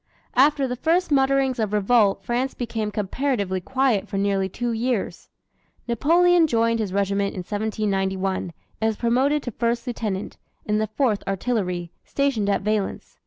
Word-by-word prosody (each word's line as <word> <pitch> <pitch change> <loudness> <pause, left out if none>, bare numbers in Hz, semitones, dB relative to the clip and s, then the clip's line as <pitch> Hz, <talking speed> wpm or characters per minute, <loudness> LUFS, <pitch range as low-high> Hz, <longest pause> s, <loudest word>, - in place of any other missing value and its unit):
After 280 0 +4
the 250 - -3
first 330 +7 +1
mutterings 270 -2 +2
of 215 -2 -1
revolt 210 -1 +3
France 250 +3 -1
became 225 -3 -3
comparatively 205 -2 -1
quiet 255 -2 +1
for 200 - -4
nearly 195 -1 +1
two 240 +5 -3
years. 230 -1 -2 0.6
Napoleon 335 +8 +4
joined 230 -3 +1
his 210 -4 -2
regiment 200 0 0
in 185 - -3
1791, 195 -3 -1 0.3
and 220 - +2
was 220 - 0
promoted 265 +5 +1
to 245 - -4
first 235 +3 -1
lieutenant, 215 -5 -4 0.3
in 210 0 +1
the 215 - 0
Fourth 215 -1 0
Artillery, 185 -4 -2
stationed 270 -8 0
at 200 - +1
Valence. 210 -1 -2
220 Hz, 150 wpm, -23 LUFS, 200-260 Hz, 0.6 s, After